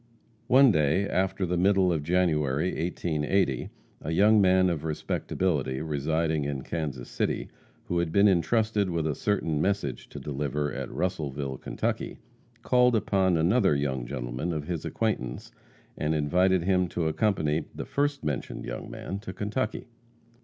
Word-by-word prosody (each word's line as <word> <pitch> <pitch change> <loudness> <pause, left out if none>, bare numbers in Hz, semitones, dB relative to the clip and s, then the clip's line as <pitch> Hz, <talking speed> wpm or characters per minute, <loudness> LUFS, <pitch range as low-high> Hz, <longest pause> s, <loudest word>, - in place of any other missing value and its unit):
One 130 0 +7
day, 80 +4 +2
after 95 0 0
the 90 0 -1
middle 95 0 +3
of 80 - -1
January, 75 -2 +1
1880, 80 -2 0 0.3
a 75 - -5
young 105 +6 +5
man 95 -1 +4
of 80 -3 -3
respectability, 75 -3 -1
residing 80 +1 0
in 70 -2 -3
Kansas 70 -7 -4
City, - - -2 0.3
who 85 - -1
had 85 -2 -1
been 100 +3 +5
entrusted 105 +2 +2
with 85 -2 -1
a 80 - 0
certain 80 -3 0
message 95 -9 -1
to - - -8
deliver 75 0 -2
at - - -4
Russellville, 70 -7 -3
Ky., - - -3 0.5
called 125 -1 +4
upon 95 -4 +2
another 85 +2 +3
young 65 -4 -2
gentleman 65 +5 -3
of 75 -2 -3
his 85 -1 -4
acquaintance, 80 - -2 0.4
and 75 +1 -1
invited 90 +4 +2
him 90 0 +2
to 85 -1 -2
accompany 80 -4 0
the - - -5
first 145 -3 -1
mentioned 75 -3 -3
young - - -6
man 100 - -5
to 100 -2 -7
Kentucky. 110 +3 -3
85 Hz, 145 wpm, -27 LUFS, 75-95 Hz, 0.5 s, One